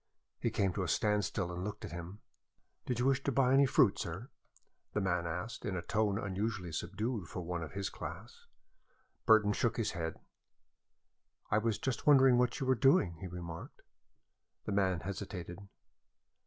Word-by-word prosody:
He - - 0
came 95 -2 0
to 95 - -2
a 90 - -1
standstill 105 -3 0
and 90 +1 -4
looked 105 +1 -5
at - - -8
him. 85 +4 -7 0.7
"Did 125 - 0
you 125 - +1
wish 135 0 +3
to 140 - +1
buy 130 0 +3
any 135 0 +6
fruit, 115 -4 +4
sir?" 95 +9 -5 0.6
the - - +1
man 90 -3 0
asked, 90 +7 -4
in 95 - -2
a 85 - -4
tone 105 +1 +1
unusually 100 -2 -2
subdued 100 +5 -3
for 90 0 -5
one 85 0 -3
of 80 - -6
his 100 0 -3
class. - - -8 0.8
Burton 105 -2 +6
shook 115 +2 0
his 115 - 0
head. 80 -2 -4 1.3
"I 105 - +4
was 110 -1 0
just 130 0 -3
wondering 135 -4 +7
what 125 0 +1
you 135 - -1
were 130 - +4
doing," 110 - +3
he 95 - -6
remarked. 85 -2 -8 0.8
The - - -3
man 95 -4 +1
hesitated. 90 -2 -6
100 Hz, 170 wpm, -33 LUFS, 90-115 Hz, 1.3 s, wondering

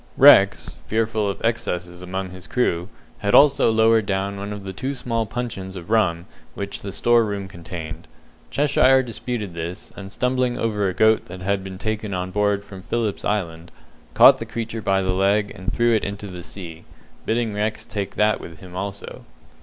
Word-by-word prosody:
Rex, 135 -9 +6
fearful 110 -1 0
of 100 - -4
excesses 90 -6 -2
among 95 +1 -4
his 90 0 -11
crew, 90 -8 0 0.3
had 100 0 +2
also 140 -4 +6
lowered 110 -1 +3
down 100 0 -1
one 100 +1 -5
of 105 -1 -6
the 95 -1 -6
two 130 +8 -3
small 115 -3 -2
puncheons 105 -4 -5
of 90 +2 -8
rum 90 -7 +2 0.3
which 100 0 -5
the 100 - -5
store 120 +7 +3
room 100 -2 -3
contained. 85 -2 -8 0.4
Cheshire 135 -2 +4
disputed 115 -4 -4
this, 85 +2 -6
and 95 -1 -9
stumbling 125 +1 0
over 105 -4 0
a - - -3
goat 110 0 +4
that 90 +1 -9
had 100 +1 -1
been 95 -1 -7
taken 110 -1 -3
on 90 0 -3
board 105 0 +1
from 95 -2 -10
Philip's 110 0 -2
Island, 85 -5 -2 0.5
caught - - +8
the - - -4
creature 115 -1 -4
by 95 -1 +1
the 95 0 0
leg, 100 +2 +2
and 95 -2 -4
threw 120 -1 +2
it 110 - +2
into 100 +1 -5
the 90 -3 -8
sea, 85 -3 -9 0.4
bidding 115 -1 0
Rex 105 +1 -2
take 100 -2 -5
that 105 0 +2
with 85 -1 -10
him 90 0 -12
also. 100 +1 -6
100 Hz, 185 wpm, -22 LUFS, 95-110 Hz, 0.5 s, caught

